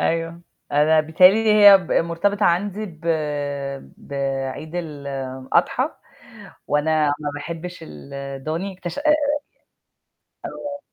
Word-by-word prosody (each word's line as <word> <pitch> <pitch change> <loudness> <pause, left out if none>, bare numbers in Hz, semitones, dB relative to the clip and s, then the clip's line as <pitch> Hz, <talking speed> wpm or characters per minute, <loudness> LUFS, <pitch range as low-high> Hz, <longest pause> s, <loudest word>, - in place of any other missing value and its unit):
أيوه. 165 +1 -1 0.3
أنا 155 +2 +4
بتهيّأ 160 +4 +6
لي 220 +1 +2
هي 205 -2 +9
ب 180 - -5
مرتبطة 200 +5 +1
عندي 200 +4 0
ب 160 -5 -13 1.0
بعيد 135 +2 -4
الأضحى، 140 -5 -2 0.8
وأنا 155 +1 +2
ما 145 -1 -3
باحبش 170 +4 -6
الدوني 140 - -6
اكتش 175 -2 -7
آآ 305 +1 0
آآ 295 -1 +2 1.0
آه. 285 0 -6
165 Hz, 105 wpm, -22 LUFS, 145-195 Hz, 1.0 s, هي